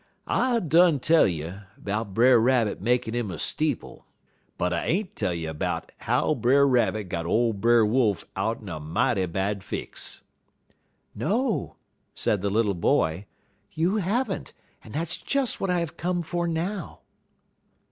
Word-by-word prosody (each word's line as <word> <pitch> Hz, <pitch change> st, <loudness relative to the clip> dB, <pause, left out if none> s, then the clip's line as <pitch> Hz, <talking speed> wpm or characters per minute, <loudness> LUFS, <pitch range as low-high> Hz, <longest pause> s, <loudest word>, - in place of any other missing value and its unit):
"I 245 Hz, -2 st, +1 dB
done 170 Hz, -3 st, +4 dB
tell 160 Hz, +5 st, +4 dB
you 85 Hz, +2 st, -4 dB, 0.2 s
'bout 100 Hz, -1 st, -4 dB
Brer 120 Hz, +1 st, +6 dB
Rabbit 115 Hz, -4 st, +2 dB
makin' 120 Hz, +1 st, +1 dB
'im 120 Hz, -4 st, -2 dB
a 90 Hz, -, -5 dB
steeple; -, -, -3 dB, 0.5 s
but 90 Hz, +1 st, 0 dB
I 85 Hz, -, -1 dB
ain't 185 Hz, +3 st, -1 dB
tell -, -, -1 dB
you 80 Hz, -2 st, -4 dB
'bout 75 Hz, -, -3 dB
how -, -, +1 dB
Brer 140 Hz, +3 st, +4 dB
Rabbit 120 Hz, -4 st, +2 dB
got 85 Hz, -1 st, -3 dB
ole 115 Hz, +4 st, +2 dB
Brer 115 Hz, +2 st, +4 dB
Wolf 110 Hz, -2 st, +1 dB
out'n 110 Hz, +2 st, -2 dB
er 85 Hz, -4 st, -5 dB
mighty 95 Hz, +6 st, 0 dB
bad 95 Hz, +3 st, -2 dB
fix." -, -, -5 dB, 0.9 s
"No," 225 Hz, -, -1 dB, 0.4 s
said 105 Hz, -, 0 dB
the 100 Hz, -, 0 dB
little 105 Hz, 0 st, +2 dB
boy, 85 Hz, +1 st, +1 dB, 0.5 s
"you 170 Hz, +7 st, +1 dB
have 215 Hz, +4 st, 0 dB
n't, -, -, -8 dB, 0.3 s
and 110 Hz, -, -12 dB
that's 160 Hz, +5 st, -3 dB
just 275 Hz, -3 st, -1 dB
what 195 Hz, -, 0 dB
I 180 Hz, -1 st, +2 dB
have 160 Hz, -6 st, -5 dB
come 175 Hz, 0 st, -1 dB
for 175 Hz, +1 st, -2 dB
now." 170 Hz, +3 st, -3 dB
120 Hz, 155 wpm, -26 LUFS, -, 0.9 s, Brer